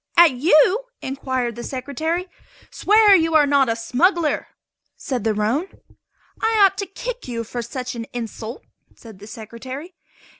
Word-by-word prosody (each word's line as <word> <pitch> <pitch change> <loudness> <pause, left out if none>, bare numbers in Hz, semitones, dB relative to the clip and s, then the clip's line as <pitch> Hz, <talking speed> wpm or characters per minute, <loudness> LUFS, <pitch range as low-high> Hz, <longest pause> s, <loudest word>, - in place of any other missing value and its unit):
"At 340 -2 +8
you?" 310 - +3 0.2
inquired 260 -3 -2
the 240 - -7
Secretary. 315 +8 -3 0.4
"Swear 420 0 +5
you 325 -2 +2
are 300 -2 +6
not 280 -3 +3
a 225 - +1
smuggler," 305 - +1 0.5
said 250 -5 -3
the 220 -1 0
roan. 230 - 0 0.7
"I 445 0 +2
ought 390 - +2
to 400 - -3
kick - - -6
you 230 -2 -3
for 240 +2 -5
such 250 +2 -5
an 230 -1 -6
insult," 230 0 -6 0.3
said 220 -5 -14
the 205 - -12
Secretary. 255 - -9
265 Hz, 150 wpm, -21 LUFS, 235-345 Hz, 0.7 s, At